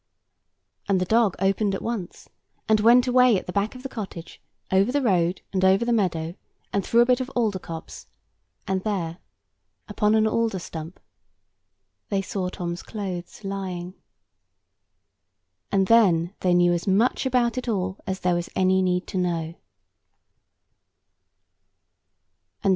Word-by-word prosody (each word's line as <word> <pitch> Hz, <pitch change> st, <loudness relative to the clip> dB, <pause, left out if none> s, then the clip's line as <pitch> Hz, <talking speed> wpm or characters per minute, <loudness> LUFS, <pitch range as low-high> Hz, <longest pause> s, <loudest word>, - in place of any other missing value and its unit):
And 195 Hz, -2 st, +3 dB
the 185 Hz, -, 0 dB
dog 220 Hz, -1 st, +3 dB
opened 195 Hz, +1 st, +1 dB
at -, -, -5 dB
once; 225 Hz, -7 st, -5 dB, 0.4 s
and 215 Hz, -1 st, +4 dB
went 240 Hz, +3 st, +6 dB
away 250 Hz, -3 st, +5 dB
at -, -, -5 dB
the 180 Hz, -, -6 dB
back 205 Hz, +4 st, -1 dB
of 255 Hz, -, -10 dB
the -, -, -3 dB
cottage, 195 Hz, -9 st, -8 dB, 0.3 s
over 195 Hz, +5 st, +3 dB
the 285 Hz, -, +1 dB
road, 180 Hz, -5 st, +1 dB
and 190 Hz, -1 st, 0 dB
over 190 Hz, +4 st, +4 dB
the 240 Hz, -, +1 dB
meadow, 170 Hz, -6 st, 0 dB, 0.4 s
and 200 Hz, -, +1 dB
through 235 Hz, +6 st, +4 dB
a -, -, +5 dB
bit 250 Hz, 0 st, +3 dB
of 255 Hz, -, -4 dB
alder 220 Hz, -6 st, +1 dB
copse; 165 Hz, -2 st, -9 dB, 0.6 s
and 190 Hz, -1 st, -1 dB
there, 180 Hz, -5 st, -2 dB, 0.7 s
upon 210 Hz, 0 st, +1 dB
an 220 Hz, 0 st, +3 dB
alder 225 Hz, -2 st, 0 dB
stump, 165 Hz, -1 st, -8 dB, 1.1 s
they 200 Hz, -, +1 dB
saw 185 Hz, -2 st, -3 dB
Tom's 175 Hz, -2 st, -5 dB
clothes 190 Hz, -3 st, -6 dB
lying. 185 Hz, -2 st, -5 dB, 1.8 s
And 195 Hz, -1 st, +3 dB
then 185 Hz, -5 st, +4 dB
they 180 Hz, -1 st, +2 dB
knew 175 Hz, 0 st, +4 dB
as 175 Hz, +2 st, -3 dB
much 220 Hz, +7 st, +2 dB
about 245 Hz, -2 st, +1 dB
it 250 Hz, -, -8 dB
all 190 Hz, -3 st, -2 dB
as 190 Hz, 0 st, -3 dB
there 180 Hz, -1 st, +2 dB
was 175 Hz, 0 st, -2 dB
any 190 Hz, 0 st, +3 dB
need 180 Hz, 0 st, 0 dB
to 185 Hz, -, -3 dB
know. 165 Hz, -2 st, -1 dB
195 Hz, 150 wpm, -24 LUFS, 180-220 Hz, 1.8 s, went